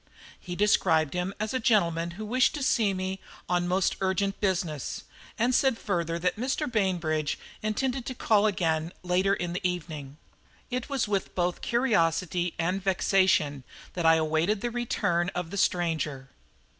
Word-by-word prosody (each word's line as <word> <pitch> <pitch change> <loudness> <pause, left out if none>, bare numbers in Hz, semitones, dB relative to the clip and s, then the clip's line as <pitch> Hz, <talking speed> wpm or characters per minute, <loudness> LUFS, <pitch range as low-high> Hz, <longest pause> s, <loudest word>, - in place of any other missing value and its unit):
He 180 - -6
described 165 -7 +3
him 180 +1 -1
as 215 +2 -2
a 260 - +1
gentleman 170 -8 +2
who 215 - -5
wished 255 +7 +2
to 290 - -3
see 220 -6 +3
me 190 0 -3 0.3
on 175 0 +1
most 185 +1 +1
urgent 195 +1 0
business, 175 -8 -1 0.3
and 240 +3 +2
said 265 -2 +3
further 170 -5 -1
that 180 +3 0
Mr. 265 +6 -1
Bainbridge 175 - 0 0.2
intended 245 +4 -1
to 255 - -4
call 215 -2 +3
again 165 -4 0
later 185 +2 +2
in 175 -2 -3
the 180 - -3
evening. 155 -6 -4 0.5
It 250 +1 -3
was 275 -5 0
with 200 -2 -2
both 175 -1 0
curiosity 180 -7 +1
and 180 +3 -1
vexation 185 -7 +2 0.3
that 170 -2 0
I 165 - +7
awaited 160 +6 +1
the 240 - -2
return 175 -7 0
of 175 -1 -3
the - - -5
stranger. 160 -8 0
185 Hz, 155 wpm, -28 LUFS, 170-215 Hz, 0.5 s, I